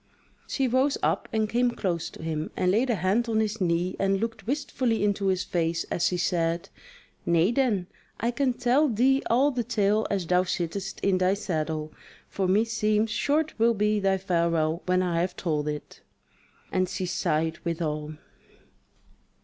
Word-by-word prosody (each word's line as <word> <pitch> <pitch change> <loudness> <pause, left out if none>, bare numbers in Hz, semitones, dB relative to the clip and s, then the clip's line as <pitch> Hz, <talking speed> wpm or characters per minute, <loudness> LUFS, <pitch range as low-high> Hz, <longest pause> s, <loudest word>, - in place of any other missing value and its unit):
She 270 -2 0
rose 260 +3 +2
up - - 0
and 220 -1 +1
came 245 +3 +2
close 180 -8 -2
to - - -11
him, 155 -1 -3
and 180 - +2
laid 235 +6 +2
a 235 - +2
hand 200 +6 +1
on 220 -1 +2
his 215 0 -1
knee 175 +1 0
and 195 0 +2
looked 225 -2 -4
wistfully 255 -5 0
into 200 -1 +1
his 185 -1 +1
face 165 -1 -1
as 170 - +1
she 180 - -1
said: 170 -1 0 0.5
"Nay 170 +4 +3
then, 235 -8 +1 0.3
I 235 +2 0
can 260 0 +1
tell 255 +5 +2
thee 260 +4 +3
all 265 +5 +4
the 250 -3 -1
tale 210 0 +1
as 195 -3 -1
thou 180 +2 +3
sittest 185 +2 -3
in 190 -2 +2
thy 185 +1 +3
saddle; 155 -5 -3 0.3
for 190 -2 -2
meseems 215 +1 +2
short 310 +6 +1
will 230 +1 +4
be 210 +1 +1
thy 195 -1 +2
farewell 170 -3 0
when 185 0 +2
I 170 -2 0
have 180 0 -2
told 150 -4 -1
it." 150 0 -6 0.7
And 185 -1 +1
she 190 0 -3
sighed 165 -3 -1
withal. 155 -3 -3
195 Hz, 170 wpm, -26 LUFS, 170-225 Hz, 0.7 s, all